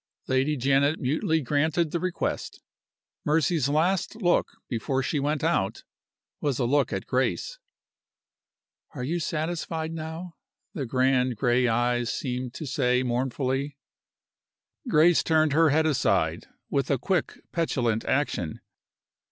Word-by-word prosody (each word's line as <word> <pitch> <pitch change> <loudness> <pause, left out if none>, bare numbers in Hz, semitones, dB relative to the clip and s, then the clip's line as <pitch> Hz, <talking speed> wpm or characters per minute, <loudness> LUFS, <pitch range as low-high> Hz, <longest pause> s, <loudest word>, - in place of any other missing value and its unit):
Lady 135 +3 +1
Janet 140 +4 +2
mutely 155 +4 0
granted 150 +4 +1
the 170 - -1
request. 185 0 -3 0.6
Mercy's 155 -2 +2
last 170 +8 +1
look, 175 -4 +2 0.2
before 130 +3 -1
she 150 - -1
went 145 +2 -1
out, 160 - 0 0.6
was 140 -4 -1
a 125 - +1
look 140 +4 +2
at - - -3
Grace. - - -1 1.4
"Are 125 - -4
you 165 +7 -1
satisfied 160 0 -3
now?" 165 +2 -6 0.4
the 140 -5 -4
grand 130 0 +2
gray 125 +3 +2
eyes 120 +1 +1
seemed 125 -2 -4
to 160 - -5
say, 125 -1 +1
mournfully. 130 +3 -1 1.1
Grace 170 -2 +5
turned 155 -2 +2
her 160 +1 +5
head 155 +2 +3
aside, 155 -4 +1 0.2
with 140 -1 0
a 140 - +2
quick, 185 +8 -1
petulant 120 -9 0
action. 110 - -1
145 Hz, 125 wpm, -26 LUFS, 125-160 Hz, 1.4 s, Grace